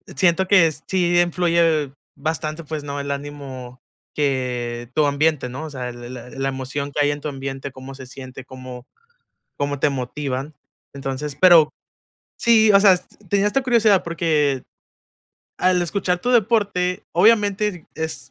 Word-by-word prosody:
siento 185 +5 +2
que 180 -5 +5 0.2
sí 175 -2 +2
influye 170 -4 +2 0.2
bastante, 155 +2 -3
pues, 155 -1 -5
no 140 0 -5
el 140 0 -5
ánimo 135 -3 -7 0.4
que 125 -4 -2
tu 150 -2 +3
ambiente, 145 -2 +1
¿no?, 135 +5 -6
o 155 - -6
sea, 125 -2 -5
la 120 0 -10
la 125 -1 -9
la 135 -1 -3
emoción 135 +2 -4
que 145 +1 +1
hay - - +2
en 145 0 -5
tu - - -4
ambiente, 135 0 -6
cómo 130 +1 -10
se 130 -1 -10
siente, 130 0 -10
cómo 130 -1 -10 0.7
cómo 145 -1 -2
te 150 - +3
motivan, 135 +2 -4 0.4
entonces 135 +1 -5
pero 170 -4 +7 0.7
sí, 220 -2 +5
o 200 - +7
sea, 195 -3 +6 0.3
tenía 200 0 +3
esta 270 +6 +1
curiosidad 225 -6 +3
porque 155 -5 0 0.9
al 180 -1 +2
escuchar 180 0 -1
tu 245 - -2
deporte, 205 -5 +1
obviamente 205 -1 +2
es 155 -5 -5
150 Hz, 150 wpm, -21 LUFS, 135-180 Hz, 0.9 s, pero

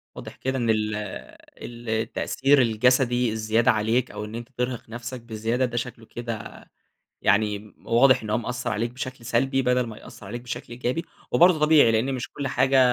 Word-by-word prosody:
واضح - - -9
كده 130 0 -2
إن 120 -2 0
ال 110 -1 +1 0.6
ال 120 -1 -9
التأثير 130 +5 +2
الجسدي 125 +1 +2
الزيادة 110 +1 +2
عليك 115 +3 0
أو 105 - -5
إن 105 +1 -8
أنت 120 +1 -7
ترهق 125 -2 -3
نفْسَك 120 +2 -6
بزيادة، 115 +2 -1
ده 120 -1 -4
شكله 120 -2 -5
كده 115 -3 -7 0.6
يعني 105 +1 +1
واضح 130 +2 +5
إن 110 - -5
هو 110 - +2
مأثَّر 125 +1 -3
عليك 115 +2 -1
بشكل 130 -1 -7
سلبي، 135 +3 +1
بدل 125 -1 +2
ما 110 - -8
يأثَّر 105 - -12
عليك 120 +5 -5
بشكل 120 -1 -6
إيجابي. 125 +7 -2 0.3
وبرضه 175 -2 +5
طبيعي؛ 145 -7 +6
لأن 125 +5 +1
مش 125 0 -5
كل 140 -2 -3
حاجة 130 +1 +3
120 Hz, 175 wpm, -25 LUFS, 110-130 Hz, 0.6 s, طبيعي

